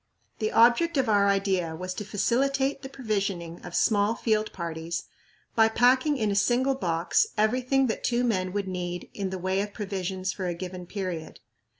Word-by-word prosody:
The 215 -1 0
object 245 +9 +4
of 260 -2 +2
our 200 -1 +4
idea 190 -4 +1
was 185 +2 -5
to 210 - -5
facilitate 270 +6 0
the 265 - -7
provisioning 200 -9 -3
of - - -7
small 210 0 +3
field 215 -2 0
parties 170 -1 -4 0.5
by 225 -1 +5
packing 255 +6 +3
in 215 -4 0
a - - 0
single 245 +7 +2
box 175 - +1
everything 255 +5 +2
that 225 - -2
two 245 0 +1
men 185 -6 0
would 200 0 -2
need 180 -1 -4
in 195 -2 -3
the 190 - -4
way 190 +2 0
of 205 0 -5
provisions 190 -2 -3
for 185 -2 -4
a 175 - -2
given 180 0 -7
period. 180 -5 -5
205 Hz, 180 wpm, -27 LUFS, 185-240 Hz, 0.5 s, by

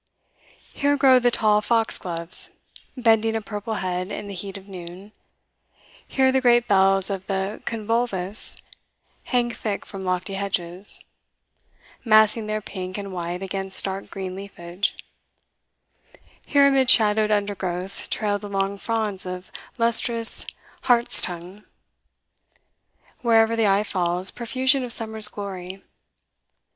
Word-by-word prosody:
Here 285 0 +1
grow 265 -2 +6
the 245 0 +3
tall 210 -3 +2
foxgloves, 185 -7 -2 0.5
bending 225 -2 +2
a - - 0
purple 210 +1 -5
head 185 -1 -3
in 210 - -6
the 200 - -7
heat 195 +1 -6
of 195 0 -14
noon; 185 +1 -10 1.0
here 265 -1 +2
the 265 0 +1
great 240 -1 +4
bells 195 0 +3
of 190 -1 -5
the 195 +1 -3
convolvulus 220 -3 +1 0.7
hang 240 -1 0
thick 215 -2 -4
from 195 -2 -8
lofty 185 +1 -2
hedges, 195 -1 -1 1.0
massing 215 -1 +4
their 215 0 -2
pink 185 -2 -6
and 200 -1 -6
white 175 +1 -4
against 195 0 -1
dark 195 0 -5
green 190 -1 -6
leafage; 190 -1 -4 1.5
here 280 -1 +5
amid 270 -2 +3
shadowed 215 -2 +5
undergrowth 195 -3 -3
trail 205 -1 -1
the 205 - -8
long 195 0 -2
fronds 215 -3 0
of 180 0 -7 0.3
lustrous 230 0 +4 0.4
hartstongue; 200 -5 +1 1.6
wherever 230 -1 +3
the 225 -2 +2
eye 200 +1 +3
falls, 180 -2 -1
profusion 260 +3 0
of 245 - -6
summer's 220 -2 +3
glory. 190 -2 -8
205 Hz, 120 wpm, -23 LUFS, 190-225 Hz, 1.6 s, grow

